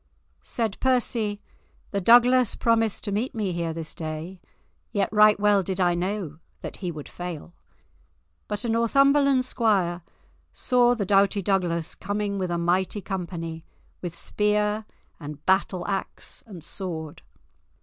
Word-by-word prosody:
Said 225 -4 -3
Percy: 235 -5 +1 0.5
"The 200 - -1
Douglas 245 +3 +5
promised 225 -2 +1
to 205 - -2
meet 220 +6 -2
me 210 -4 -1
here 170 -1 -2
this 160 -1 -5
day, 160 +3 -6 0.5
yet 200 0 0
right 210 -1 +6
well 205 -1 +4
did 190 +1 -4
I 175 -1 +3
know 175 -3 -3 0.2
that - - -7
he 180 -3 -3
would 150 -3 -8
fail." 175 -1 -7 0.9
But 210 +3 -3
a - - -1
Northumberland 275 +3 +3
squire 195 -8 +1 0.5
saw 245 -1 +3
the 210 -4 -2
doughty 200 +1 +3
Douglas 175 -4 0
coming 205 0 -3
with 185 -1 -2
a 175 - -1
mighty 180 +4 0
company, 170 -4 -5 0.4
with 175 -2 -5
spear 210 +2 0 0.3
and 150 -1 -9
batter 190 -1 +2
axe 195 -1 -4
and 180 -7 -10
sword. 160 -5 -6
195 Hz, 140 wpm, -25 LUFS, 175-215 Hz, 0.9 s, right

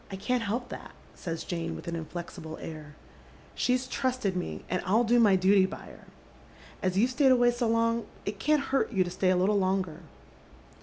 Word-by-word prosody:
" - - -14
I - - -4
can't 235 +6 -1
help 230 +4 -2
that," - - -9 0.2
says 165 -2 -5
Jane, 170 -2 -3
with - - -9
an 170 - -2
inflexible 165 0 -7
air. 155 -2 -9 0.3
" - - -25 0.3
She's 255 +1 +1
trusted 255 -7 -1
me, 180 - -4
and 180 - -1
I'll 215 +6 +3
do 240 +1 +4
my 210 -4 +6
dooty 190 +1 +4
by 215 - -8
her. - - -14 0.8
As 185 -1 0
you've 240 +5 +3
sfeiyed 265 +1 +4
away 245 -1 +5
8o 240 -1 -1
long 230 0 +1 0.2
it 205 0 -4
can't 300 +2 +2
hurt 270 - +2
you 190 -5 +3
to 175 - -6
stay 185 +1 +1
a 185 - +4
little 200 +3 +3
longer." 185 -4 0
200 Hz, 205 wpm, -29 LUFS, 180-240 Hz, 0.8 s, my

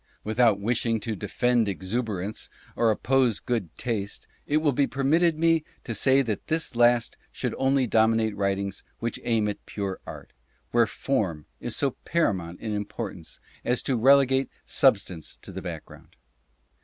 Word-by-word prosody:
Without 110 -1 +3
wishing 115 +1 0
to 115 -2 -3
defend 115 +3 +1
exuber 100 0 -2
ance, 105 - -5 0.3
or 115 - +3
oppose 125 0 +2
"good 115 -8 -2
taste," 105 -5 -3 0.2
it 150 - +2
will 155 -2 +3
be 140 +1 +2
permitted 155 +4 +2
me 165 -1 +3 0.2
to 115 - -4
say 135 +4 +4
that 110 -5 -4
this 160 -5 -1
last 120 0 +3
should - - -3
only 135 0 +3
dominate 110 -1 +2
writings 100 0 -1 0.2
which 115 0 -3
aim 110 -3 +1
at 105 - -4
pure 100 -2 -4
art, - - -9 0.4
where 120 -1 +4
form 100 - -2
is 120 - -3
so 140 -2 +1
paramount 95 - 0
in 110 - -4
importance 105 -4 -5 0.2
as 125 +1 0
to 135 - 0
relegate 135 +2 +4 0.2
substance 100 - +1
to - - -10
the - - -6
background. - - -9
115 Hz, 155 wpm, -26 LUFS, 105-135 Hz, 0.4 s, say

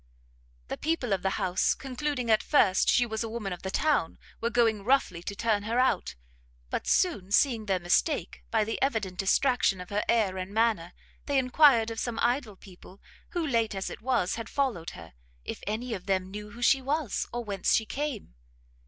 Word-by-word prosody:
The - - -3
people 290 -8 -1
of 190 - -1
the 190 - +1
house, 180 0 +1
concluding 265 -2 -3
at 215 - +4
first 200 -11 +3
she 245 - +4
was 220 -1 -3
a 225 - -4
woman 215 -4 -4
of 175 - -9
the 190 - -4
town, 295 - +1 0.2
were 230 - +1
going 225 -4 +2
roughly 225 -8 +1
to 200 +3 -5
turn 215 -1 +1
her 225 +3 -2
out; 225 - +1 0.6
but - - -3
soon 250 - +1
seeing 225 -1 +2
their 190 -1 +2
mistake, 180 - 0
by 220 -2 +2
the 225 +2 -4
evident 215 -9 -1
distraction 200 -1 +2
of 180 +1 -9
her 205 +1 0
air 210 -5 +2
and 185 +3 -6
manner, 220 -7 +1 0.3
they 285 -1 +1
enquired 255 -3 +4
of 225 - -5
some 240 -2 -3
idle 240 -3 0
people 190 0 -15 0.3
who, 345 -3 -1
late 230 -7 0
as 195 - -4
it - - -9
was, 240 -7 +1
had 230 -1 -6
followed 245 - -1
her, 80 -3 -12 0.3
if - - -6
any 225 +3 -2
of 185 -2 -7
them 190 -1 0
knew 210 +1 -7
who 235 +2 -8
she 270 +2 +4
was, 280 -3 -1
or 240 0 -3
whence 200 -4 -1
she 220 - +1
came? 275 - -4
225 Hz, 195 wpm, -28 LUFS, 195-255 Hz, 0.6 s, at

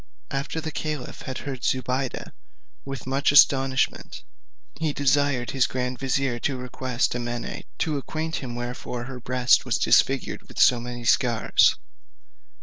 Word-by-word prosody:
After 140 +4 -3
the 160 0 -4
caliph 150 -4 -5
had 130 - -4
heard 135 -4 -5
Zobeide 130 +1 -1 0.5
with 135 -1 -7
much 135 +3 +1
astonishment, 135 -2 +3 0.6
he 155 -2 0
desired 140 -3 +1
his 135 -2 +2
grand 125 0 -3
vizier 135 -2 0
to 135 +2 -1
request 125 0 -2
Amene 120 -1 -4
to 155 -3 0
acquaint 160 +3 -4
him 120 -3 -6
wherefore 120 0 -5
her 125 +1 -7
breast 125 0 +3
was - - 0
disfigured - - +2
with - - -9
so 125 - +6
many 120 0 -6
scars. 120 -1 +3
130 Hz, 140 wpm, -25 LUFS, 125-140 Hz, 0.6 s, so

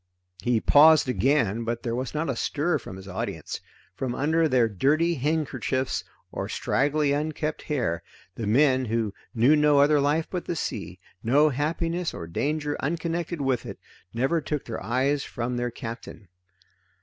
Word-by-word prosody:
He 120 +2 +2
paused 155 +4 +6
again, 115 -1 +1
but 120 +2 -3
there 115 -3 -2
was 130 +4 -4
not 160 +2 -1
a 135 - -1
stir 150 +6 0
from 95 - -9
his 95 0 -11
audience. 95 - -5 0.3
From 125 +5 -3
under 160 +3 +2
their 125 -4 +4
dirty 150 - +1
headkerchiefs 140 -2 -1 0.3
or - - -4
straggly 145 +1 +1
unkempt 150 +1 -2
hair, 115 - -1 0.3
the 110 +2 -4
men 130 +3 +4
who 110 -3 -1 0.2
knew 125 +7 +5
no 150 -1 +4
other 145 +1 +5
life 150 +3 +1
but 180 -2 -4
the 175 - -2
sea, - - -4 0.2
no 145 +6 +4
happiness 165 +5 -1
or 85 - -6
danger 145 - -1
unconnected 170 +1 -2
with 135 -3 0
it, - - -7 0.3
never 135 +8 +1
took 150 -1 -3
their 115 - -5
eyes 135 +4 +1
from 120 +1 -4
their 120 0 -1
captain. 115 -4 -8
140 Hz, 160 wpm, -26 LUFS, 120-155 Hz, 0.3 s, paused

